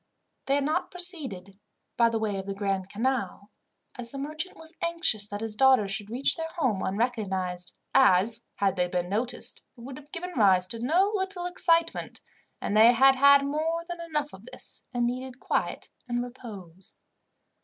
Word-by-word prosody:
They 275 - +3
had 285 - +1
not 305 - -1
proceeded 270 - 0 0.4
by 235 -1 +4
way 220 -3 -1
of 190 - -7
the 195 - -4
Grand 195 -2 -2
Canal, 210 -3 -2 0.4
as 240 -1 -7
the 275 - -8
merchant 305 +6 -5
was 320 +1 -12
anxious 335 -12 0
that 205 0 -6
his 225 -1 +1
daughters 255 -5 +4
should 205 -1 -3
reach 250 +5 +2
their 325 -1 -4
home 255 - 0
unrecognized, 190 -5 -2 0.2
as, 225 -3 +4
had 195 -1 0
they 180 0 +1
been 180 -1 -2
noticed, 230 +5 0
it - - -13
would 260 +2 -8
have 290 0 -19
given 360 +2 -6
rise 190 -6 +5
to 230 - -4
no 345 - +2
little 380 -3 -2
excitement, 335 -2 +1 0.4
and 205 - -2
they 225 +3 +7
had 270 +2 +6
had 280 +1 +6
more 320 +4 -2
than 345 -1 -6
enough 300 -3 -3
of 190 +3 -13
this, 255 0 -5
and 245 -1 0
needed 255 +1 -4
quiet - - -2 0.2
and 240 0 -1
repose. 200 -8 -9
245 Hz, 175 wpm, -27 LUFS, 200-300 Hz, 0.4 s, they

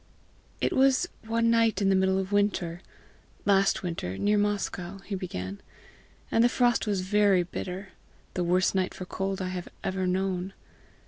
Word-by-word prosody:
"It - - +1
was 270 +5 +4 0.2
one 230 +1 +2
night 230 -3 +3
in 195 -1 +2
the 195 - +4
middle 190 0 +3
of 190 +1 -2
winter 195 -4 0 0.6
last 195 -1 +3
winter, 130 - -3
near 205 +1 +2
Moscow," 200 -3 -1
he 210 - -6
began, 100 - -5 0.7
"and 225 - +4
the 240 - +5
frost 240 -2 +2
was 200 -3 0
very 195 -1 +3
bitter 185 +2 -6 0.4
the 180 - -1
worst 180 +2 +2
night 190 -1 0
for 185 - -6
cold 190 +1 -3
I 185 - -2
have 180 -1 -5
ever 185 0 -1
known. 185 0 -1
190 Hz, 165 wpm, -28 LUFS, 185-205 Hz, 0.7 s, the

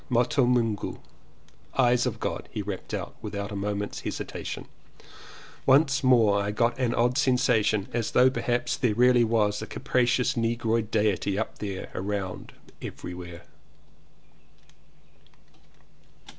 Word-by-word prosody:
"Moto 125 +1 +2
Mungu. 115 -4 0 0.8
"Eyes 125 -1 +3
of 115 -2 -4
God," - - -4
he 105 -3 -4
rapped 100 -2 -6
out - - -4
without 100 0 -5
a - - -5
moment's 100 +1 -3
hesitation. - - -5 1.0
Once 140 +1 +4
more 115 -6 +4
I 100 - -2
got 115 +3 +1
an 120 -2 +1
odd 120 +1 +2
sensation 110 -5 +2
as 115 -2 -1
though 130 +1 +5
perhaps 120 -1 -1
there 115 -5 +1
really 125 0 +5
was 110 -2 +1
a 110 - -6
capri 125 -1 0
cious 125 0 +1
negroid 115 -1 0
diety 105 -3 +1
up 110 - -3
there, 100 -3 -5
around, 95 -1 -4 0.3
every 90 - -7
where. 85 -1 -9
115 Hz, 130 wpm, -27 LUFS, 105-125 Hz, 1.0 s, though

